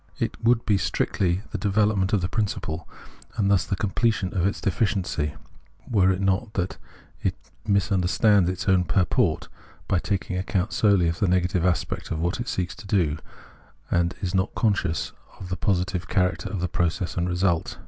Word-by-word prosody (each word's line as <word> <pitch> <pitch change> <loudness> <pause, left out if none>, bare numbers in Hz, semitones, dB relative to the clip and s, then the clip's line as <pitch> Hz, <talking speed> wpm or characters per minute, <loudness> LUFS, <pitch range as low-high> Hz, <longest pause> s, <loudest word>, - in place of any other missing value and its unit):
It - - -3
would 115 0 +3
be 100 -3 +3
strictly 90 +1 0
the - - -3
development 100 -1 +2
of 105 - +2
the 90 - 0
principle, 95 -6 -3 0.5
and 100 -2 +2
thus 95 -3 +3
the - - 0
completion 100 0 0
of 95 0 +2
its 100 - -2
deficiency, 95 -7 -1 0.5
were 100 -7 +3
it 95 0 +1
not 100 +3 0
that 95 -1 -2 0.4
it - - 0 0.3
misunderstands 100 0 +3
its 90 - -4
own 95 -2 +4
purport 90 0 +1 0.4
by 95 - +2
taking 100 0 -2
account 95 +2 -1
solely 100 -5 +4
of 85 0 -1
the 100 - +2
negative 90 -1 +1
aspect 90 -2 -1
of - - -2
what 85 +7 -1
it 120 - -4
seeks 90 -5 -2
to 120 -5 -11
do, 85 -8 +1 0.7
and 85 +1 +1
is 90 0 -1
not 95 0 0
conscious 100 -7 0 0.3
of 90 - -8
the 90 - -1
positive 90 0 -1
char 90 -3 +2
acter 85 - -7
of 95 -4 -4
its 90 - -2
process 85 +1 -1
and 90 0 0
result. 90 -2 0
95 Hz, 180 wpm, -25 LUFS, 90-100 Hz, 0.7 s, own